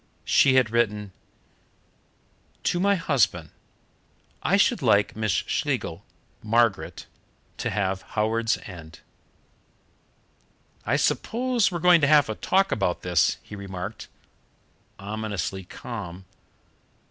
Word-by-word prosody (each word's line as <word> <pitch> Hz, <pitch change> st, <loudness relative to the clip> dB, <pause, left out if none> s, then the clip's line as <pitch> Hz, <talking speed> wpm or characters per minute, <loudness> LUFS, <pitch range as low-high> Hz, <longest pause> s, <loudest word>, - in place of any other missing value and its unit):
She 130 Hz, -1 st, +4 dB
had 125 Hz, -4 st, +3 dB
written: 105 Hz, -4 st, 0 dB, 1.5 s
"To 175 Hz, -, 0 dB
my 200 Hz, +2 st, +3 dB
husband: 120 Hz, -, 0 dB, 0.9 s
I -, -, +2 dB
should -, -, +2 dB
like 100 Hz, 0 st, +3 dB
Miss 110 Hz, -1 st, -1 dB
Schlegel -, -, -2 dB, 0.4 s
(Margaret) 115 Hz, -2 st, 0 dB, 0.5 s
to -, -, -1 dB
have 95 Hz, -2 st, -1 dB, 0.2 s
Howards 110 Hz, +1 st, +1 dB
End." 85 Hz, -4 st, -11 dB, 1.9 s
"I -, -, +2 dB
suppose 240 Hz, -3 st, +1 dB
we're 175 Hz, -, -2 dB
going 175 Hz, 0 st, +5 dB
to 145 Hz, -, +4 dB
have 145 Hz, -4 st, +5 dB
a -, -, -1 dB
talk 195 Hz, -, +1 dB
about 95 Hz, -4 st, -1 dB
this?" 90 Hz, -3 st, +2 dB
he 105 Hz, -, -10 dB
remarked, 95 Hz, +1 st, -7 dB, 0.9 s
ominously 100 Hz, -2 st, -4 dB
calm. 95 Hz, -3 st, -8 dB
110 Hz, 105 wpm, -25 LUFS, 95-140 Hz, 1.9 s, going